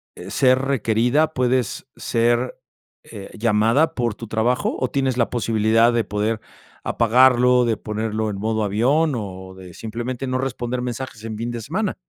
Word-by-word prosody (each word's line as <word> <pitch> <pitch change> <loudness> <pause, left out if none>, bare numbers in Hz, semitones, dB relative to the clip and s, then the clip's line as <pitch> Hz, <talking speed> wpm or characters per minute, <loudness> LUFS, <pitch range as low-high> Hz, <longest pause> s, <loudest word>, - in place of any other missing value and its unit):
eh, - - -9
ser 130 -1 +3
requerida, 135 +4 +1
puedes 125 0 0
ser, 120 +2 0 0.5
eh, 100 -3 -10
llamada 115 +7 +2
por 120 -3 0
tu 115 +2 -9
trabajo, 110 +4 0
o, 130 - -1
¿tienes 135 -2 0
la 120 - +1
posibilidad 115 0 +2
de 120 -1 +1
poder 105 +2 -2 0.4
apagarlo, 125 +1 +4
de 115 -2 0
ponerlo 110 +1 -3
en 100 - -4
modo 110 +1 -1
avión, 130 +10 +2
o 95 -4 -7
de 90 -2 -12
simplemente 120 +5 -5
no 130 0 -1
responder 125 -1 -3
mensajes 125 -2 -6
en 110 -1 -5
fin 115 +2 -3
de 120 -1 -5
semana? 190 - -2
120 Hz, 160 wpm, -21 LUFS, 110-130 Hz, 0.5 s, apagarlo